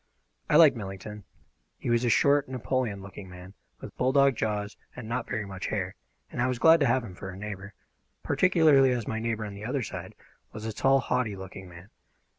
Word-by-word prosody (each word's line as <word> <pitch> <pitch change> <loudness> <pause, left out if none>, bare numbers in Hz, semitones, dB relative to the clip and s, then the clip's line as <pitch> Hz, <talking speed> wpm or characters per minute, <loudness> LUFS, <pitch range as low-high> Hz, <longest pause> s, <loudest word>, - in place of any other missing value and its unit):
I - - +3
liked 155 -4 +8
Millington. 105 0 -7 0.5
He - - -3
was 120 +1 +2
a 120 - +2
short, 140 +4 +3
Napoleon 125 -5 -2
looking 95 0 -10
man, 90 +1 -11 0.3
with - - -10
bulldog 135 +1 +3
jaws 105 -1 -2 0.2
and 120 -3 -8
not 120 +1 -3
very 110 -1 -2
much 95 -1 -6
hair, 95 -3 -2 0.4
and - - -3
I 125 - +2
was 125 -1 -1
glad 165 +5 +6
to 140 - +3
have 125 +1 +2
him 100 -6 -9
for 95 +1 -8
a 95 - -8
neighbour, 100 -1 -7 0.5
particularly 145 -4 +4
as 120 -3 -3
my 110 - -2
neighbour 110 -1 -2
on 100 - -7
the 100 +1 -9
other 130 +3 -2
side - - -7 0.4
was 110 0 -7
a 110 - -3
tall, 135 +4 +3
haughty 125 -6 -1
looking 95 0 -9
man. 85 +4 -14
110 Hz, 205 wpm, -28 LUFS, 100-130 Hz, 0.5 s, liked